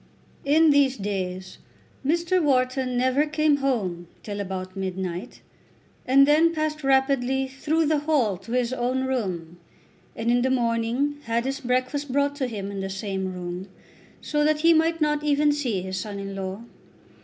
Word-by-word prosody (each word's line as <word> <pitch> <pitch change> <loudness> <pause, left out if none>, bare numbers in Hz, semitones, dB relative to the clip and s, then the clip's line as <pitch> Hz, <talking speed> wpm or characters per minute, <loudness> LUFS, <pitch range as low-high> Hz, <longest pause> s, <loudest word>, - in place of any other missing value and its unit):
In 310 +2 +5
these 280 -2 +3
days 190 -2 -4 0.4
Mr. 340 +5 +1
Wharton 255 -3 +1
never 260 +4 +2
came 305 -1 +2
home 200 -11 -1 0.2
till 205 -1 -5
about 185 -1 -5
midnight, 190 +1 -4 0.7
and 275 +2 +6
then 325 +3 +4
passed 310 -1 -2
rapidly 265 -1 +2
through 305 +5 0
the 305 0 +2
hall 285 -9 +1
to 210 +6 -9
his 250 0 +1
own 255 +1 -1
room, 185 -10 -3 0.6
and 230 +1 0
in 245 0 +3
the 260 - +1
morning 240 +3 0
had 230 +1 0
his 270 +1 -2
breakfast 255 +2 -1
brought 285 +1 +1
to 265 -3 -1
him 200 -4 -5
in 200 - -5
the 195 0 -3
same 190 -1 -3
room, 180 +1 -6 0.5
so 295 -1 0
that 305 0 +2
he 335 +1 +6
might 325 +1 +2
not 300 -1 +1
even 295 0 +3
see 245 -11 -1
his 190 0 -4
son 205 0 -5
in 195 0 -5
law. 195 +3 -5
255 Hz, 165 wpm, -25 LUFS, 195-290 Hz, 0.7 s, and